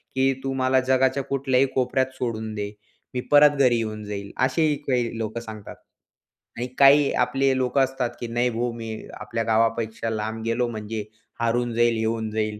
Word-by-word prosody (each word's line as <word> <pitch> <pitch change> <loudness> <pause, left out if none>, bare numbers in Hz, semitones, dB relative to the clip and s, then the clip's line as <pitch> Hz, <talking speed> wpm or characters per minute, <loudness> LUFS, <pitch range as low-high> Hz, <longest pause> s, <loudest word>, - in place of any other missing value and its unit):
की 135 0 +3
तू 135 0 -2
मला 130 0 +2
जगाच्या 130 +1 +2
कुठल्याही 135 -1 +1
कोपऱ्यात 130 0 +1
सोडून 110 -3 -3
दे, 105 0 -4 0.4
मी 125 - -2
परत 145 0 +7
घरी 125 -3 +4
येऊन 110 -1 -4
जाईल, 100 -1 -6
असेही 150 +3 +1
काही 120 -3 0
लोकं 115 +1 -3
सांगतात. 110 -3 -9 0.8
आणि 125 +1 -2
काही 140 +1 +6
आपले 135 +2 +2
लोकं 130 +1 +1
असतात 130 -2 -1
की 120 - -4
नाही 120 +2 +1
भाऊ, 120 +1 -2
मी 115 -1 -7
आपल्या 115 -1 -3
गावापेक्षा 115 0 0
लांब 110 +1 -3
गेलो 120 +1 0
म्हणजे 110 -1 -5 0.4
हरवून 120 0 0
जाईल, 120 -1 +3
येऊन 110 0 -1
जाईल. 105 -1 -2
120 Hz, 165 wpm, -24 LUFS, 110-130 Hz, 0.8 s, परत